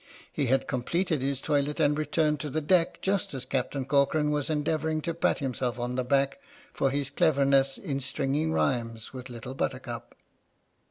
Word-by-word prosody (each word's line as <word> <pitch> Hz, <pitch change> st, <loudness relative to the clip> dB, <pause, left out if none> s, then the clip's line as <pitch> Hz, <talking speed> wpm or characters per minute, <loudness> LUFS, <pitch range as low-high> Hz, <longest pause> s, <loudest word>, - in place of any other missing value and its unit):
He 140 Hz, -, 0 dB
had 135 Hz, +2 st, +2 dB
completed 155 Hz, +4 st, 0 dB
his 135 Hz, 0 st, -1 dB
toilet 145 Hz, 0 st, 0 dB
and 150 Hz, -1 st, +4 dB
returned 150 Hz, 0 st, +1 dB
to 150 Hz, -, -4 dB
the 155 Hz, -, -1 dB
deck 165 Hz, +3 st, +2 dB
just 195 Hz, -6 st, 0 dB
as 130 Hz, -1 st, -5 dB
Captain 130 Hz, +1 st, -2 dB
Corcoran 145 Hz, +2 st, +2 dB
was 150 Hz, -1 st, -1 dB
endeavouring 155 Hz, +1 st, 0 dB
to 170 Hz, -, -2 dB
pat 170 Hz, -, +1 dB
himself 125 Hz, -4 st, -2 dB
on 120 Hz, +1 st, -2 dB
the 130 Hz, 0 st, 0 dB
back 140 Hz, +2 st, +1 dB, 0.3 s
for 135 Hz, -, +1 dB
his 140 Hz, 0 st, -2 dB
cleverness 140 Hz, -2 st, +3 dB
in 140 Hz, -2 st, -3 dB
stringing 140 Hz, +4 st, -1 dB
rhymes 115 Hz, -6 st, -1 dB
with 125 Hz, -1 st, -7 dB
Little 120 Hz, +1 st, -7 dB
Buttercup. 135 Hz, -, -4 dB
140 Hz, 170 wpm, -28 LUFS, 130-150 Hz, 0.3 s, and